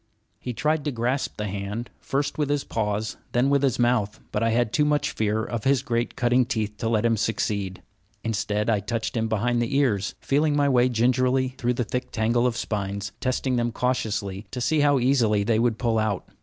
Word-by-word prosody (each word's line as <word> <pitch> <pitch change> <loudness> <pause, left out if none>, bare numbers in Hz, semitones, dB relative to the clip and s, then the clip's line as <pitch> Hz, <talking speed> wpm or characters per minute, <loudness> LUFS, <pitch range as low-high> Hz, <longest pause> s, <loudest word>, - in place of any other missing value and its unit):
He 125 - -4
tried 150 +6 0
to 145 - 0
grasp 125 +3 -1
the 105 - -2
hand, 100 +4 -4
first 140 +2 -2
with 145 -2 +1
his 145 -1 +1
paws, 105 -1 -2 0.2
then 125 +3 +3
with 140 -1 +3
his 135 -4 +1
mouth; 120 -4 +1
but 105 - -1
I 115 - +2
had 115 -1 +1
too 150 - +3
much 150 0 +1
fear 110 0 0
of 115 -3 -4
his 135 -1 +2
great 120 -3 -1
cutting 125 0 +3
teeth 110 -4 -2
to 115 - -1
let 110 -1 +1
him 115 -1 +3
succeed. 100 -3 -2 0.4
Instead 105 -1 -1
I 110 -3 +3
touched 115 +4 -3
him 115 -1 0
behind 120 +2 +1
the 120 +4 0
ears, 100 -8 +1
feeling 145 +2 +1
my 145 -1 +3
way 125 -2 +4
gingerly 125 +2 +2
through 125 -1 -1
the 125 - 0
thick 125 +3 -4
tangle 120 +2 +2
of 120 -2 -2
spines, 100 -1 -3
testing 130 0 0
them 120 0 0
cautiously 110 -5 -2
to 125 - -5
see 155 +5 +1
how 145 -1 +4
easily 120 -5 +3
they 110 +1 +2
would 115 -1 +1
pull 115 -3 +1
out. 110 -4 -1
120 Hz, 210 wpm, -25 LUFS, 105-130 Hz, 0.4 s, way